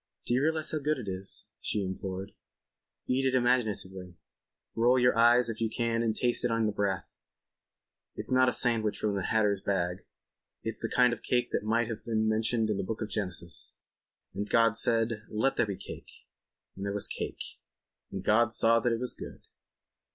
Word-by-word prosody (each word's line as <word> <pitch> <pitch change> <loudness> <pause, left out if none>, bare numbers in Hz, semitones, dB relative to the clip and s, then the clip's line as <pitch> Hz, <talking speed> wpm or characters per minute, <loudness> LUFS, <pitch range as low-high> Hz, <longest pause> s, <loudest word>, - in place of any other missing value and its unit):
"Do 125 +2 +2
realize 160 +1 +1
how 155 - -1
good 150 +1 0
it 120 -5 -7
is," 95 0 -6
she 105 - -1
implored. 95 +1 -5 0.7
"Eat 130 +1 +1
it 130 - +1
imaginatively. 105 -8 0 0.6
Roll 120 +3 +4
your 125 0 +4
eyes 120 +1 +5
if 115 -1 -4
you 115 - +1
can 115 0 0
and 115 -2 0
taste 120 +1 +1
it 120 - +2
on 115 -1 +1
the 105 - +1
breath. 100 -3 -1 1.1
It's - - -3
not 130 0 +5
a - - +1
sandwich 115 -4 +1
from 105 -1 -1
the 95 -2 -2
hatter's 105 -3 +1
bag—it's 90 -2 -5
the - - -2
kind 125 -1 +4
of 120 - -6
cake 125 -1 0
that - - 0
might 115 +2 +1
have 115 -2 -6
been 110 -1 0
mentioned 110 0 +1
in 105 - -1
the - - -2
Book 110 +4 -3
of 110 - -6
Genesis.... 90 -5 -5 0.6
And 100 +2 -4
God 115 -1 +4
said: 115 -1 +1
'Let 110 +6 +1
there - - +2
be 100 -2 -4
cake. - - -9 0.7
And 95 - -7
there 100 0 -2
was 105 - -1
cake. - - -6 0.5
And 95 -1 -5
God 110 +2 +3
saw 115 0 +4
that 120 0 +1
it 115 - 0
was 125 0 -1
good. - - -10
110 Hz, 190 wpm, -29 LUFS, 100-120 Hz, 1.1 s, eyes